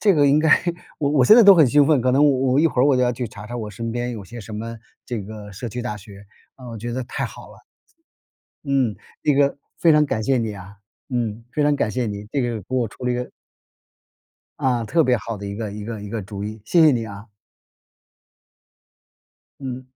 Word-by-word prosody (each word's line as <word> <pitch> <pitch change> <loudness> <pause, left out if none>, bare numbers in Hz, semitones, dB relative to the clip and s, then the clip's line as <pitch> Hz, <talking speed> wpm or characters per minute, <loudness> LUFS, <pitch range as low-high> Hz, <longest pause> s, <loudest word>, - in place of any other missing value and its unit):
这 200 -4 +4
个 145 -2 +4
应 140 +2 +4
该 160 +1 +2 0.5
我 140 -2 0
我 140 -4 +4
现 215 - +8
在 240 - +9
都 200 -2 +9
很 160 -5 +6
兴 145 +3 +4
奋， 150 -3 +4
可 125 +1 +2
能 135 +3 +4
我 130 -2 +2
我 135 - +4
一 165 - +5
会 135 -6 0
儿 130 - +5
我 140 -3 +4
就 125 - +2
要 125 0 +2
去 120 -1 -4
查 105 -1 -10
查 120 - -7
我 110 -3 -5
身 115 +3 -5
边 120 0 -2
有 105 -4 -7
些 120 +5 -9
什 105 +1 -9
么 115 +1 -6 0.3
这 120 -4 -4
个 105 0 -9
社 115 +5 -6
区 120 +3 -5
大 120 -4 -3
学。 100 0 -13 0.3
呃， 130 - -12
我 115 - -7
觉 120 +3 -5
得 130 0 -3
太 - - -4
好 - - -12
了。 - - -17 1.0
嗯， 135 -8 +1 0.3
这 150 -2 +3
个 140 0 +2 0.2
非 165 -2 +5
常 150 0 +5
感 110 -4 -2
谢 130 +3 +2
你 110 -2 -2
啊， 100 +1 -11 0.3
嗯， 115 -3 -2
非 150 - 0
常 145 0 +3
感 110 - 0
谢 125 0 -1
你， 100 0 -5
这 140 - 0
个 120 -3 -2
给 - - -24
我 120 -3 +1
出 125 - -11
了 125 - +1
一 - - 0
个 125 0 -4 1.3
啊， 125 -3 0
特 165 +9 +2
别 125 -4 +3
好 115 0 -5
的 100 0 -7
一 100 - -5
个 110 -3 -4
一 105 0 -7
个 110 -1 -6
一 105 - -8
个 110 0 -4
主 100 +1 -7
意， 110 +1 -6
谢 170 +9 +3
谢 155 -2 +7
你 115 -3 -1
啊。 100 0 -9 2.3
嗯。 130 -1 -6
120 Hz, 260 characters per minute, -22 LUFS, 110-135 Hz, 2.3 s, 在